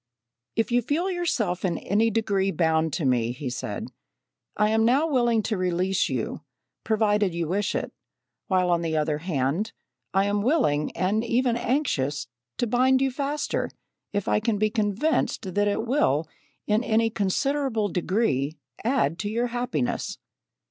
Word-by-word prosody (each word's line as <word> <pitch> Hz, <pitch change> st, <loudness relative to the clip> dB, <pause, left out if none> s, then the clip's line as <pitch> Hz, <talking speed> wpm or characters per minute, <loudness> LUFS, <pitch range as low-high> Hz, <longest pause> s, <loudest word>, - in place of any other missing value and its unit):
"If 225 Hz, +1 st, 0 dB
you 245 Hz, +1 st, +4 dB
feel 330 Hz, -, 0 dB
yourself 275 Hz, -, -1 dB
in 175 Hz, -4 st, 0 dB
any 215 Hz, +4 st, +1 dB
degree 200 Hz, -3 st, +1 dB
bound 160 Hz, -3 st, +1 dB
to 155 Hz, -1 st, -1 dB
me 120 Hz, -3 st, +2 dB
[he 130 Hz, 0 st, -5 dB
said], 125 Hz, -, -4 dB, 0.7 s
I 210 Hz, +1 st, +3 dB
am 220 Hz, 0 st, +3 dB
now 260 Hz, +7 st, +4 dB
willing 240 Hz, -6 st, +2 dB
to 215 Hz, -1 st, -1 dB
release 185 Hz, +1 st, +1 dB
you, -, -, -3 dB, 0.4 s
provided 210 Hz, -4 st, +2 dB
you 170 Hz, -2 st, -1 dB
wish 200 Hz, +4 st, 0 dB
it; -, -, -3 dB, 0.5 s
while, 185 Hz, -3 st, +2 dB
on 170 Hz, -1 st, +2 dB
the 160 Hz, -2 st, -1 dB
other 150 Hz, -1 st, 0 dB
hand, 165 Hz, -, -1 dB, 0.4 s
I 195 Hz, +1 st, +2 dB
am 205 Hz, 0 st, +1 dB
willing 210 Hz, -, +2 dB
and 195 Hz, +5 st, +1 dB
even 240 Hz, +1 st, +1 dB
anxious, 230 Hz, -, 0 dB, 0.3 s
to -, -, +1 dB
bind 255 Hz, +3 st, +3 dB
you 270 Hz, 0 st, +1 dB
faster, 285 Hz, +3 st, -2 dB, 0.4 s
if 205 Hz, -2 st, -2 dB
I -, -, +3 dB
can 220 Hz, -1 st, 0 dB
be 215 Hz, +1 st, +1 dB
convinced 215 Hz, -, 0 dB
that 205 Hz, +2 st, +2 dB
it 205 Hz, +2 st, 0 dB
will 165 Hz, -, +2 dB, 0.4 s
in 215 Hz, +3 st, +2 dB
any 225 Hz, -1 st, +2 dB
considerable 225 Hz, +3 st, 0 dB
degree 170 Hz, -, 0 dB, 0.3 s
add 215 Hz, -, +1 dB
to 205 Hz, -, -2 dB
your 235 Hz, +3 st, 0 dB
happiness. 245 Hz, 0 st, -2 dB
210 Hz, 155 wpm, -25 LUFS, 175-240 Hz, 0.7 s, you